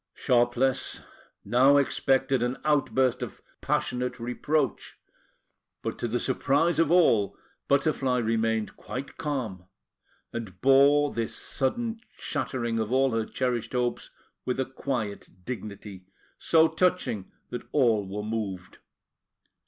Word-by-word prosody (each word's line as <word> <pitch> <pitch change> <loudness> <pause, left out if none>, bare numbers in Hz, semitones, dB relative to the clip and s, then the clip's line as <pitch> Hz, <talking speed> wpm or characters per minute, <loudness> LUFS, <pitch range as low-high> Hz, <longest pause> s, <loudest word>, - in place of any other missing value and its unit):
Sharpless 125 +1 +1 0.4
now 130 +6 +5
expected 135 -1 +2
an 125 +2 -1
outburst 135 -4 +2
of - - -6 0.2
passionate 125 0 -1
reproach; 125 +2 -1 0.9
but - - -4
to 120 - -1
the 120 +2 -1
surprise 145 +7 +1
of 165 - +3
all, 115 - +4 0.3
Butterfly 140 -3 +2
remained 110 -3 0
quite 135 +2 -7
calm, 120 - -3 0.7
and 105 -6 -6
bore 140 +4 +5
this 115 -1 -2
sudden 225 - -2 0.2
shattering 120 -3 -2
of 110 0 -2
all 135 0 +3
her 115 -1 0
cherished 125 -3 -2
hopes 125 -1 -1 0.3
with 125 +1 -2
a 130 - +1
quiet 125 -6 -4 0.2
dignity, 100 -5 -7 0.3
so 160 0 +5
touching 160 - 0 0.2
that 120 - -6
all 115 -8 +2
were 105 +2 -4
moved. 105 -5 -4
125 Hz, 115 wpm, -27 LUFS, 110-140 Hz, 0.9 s, now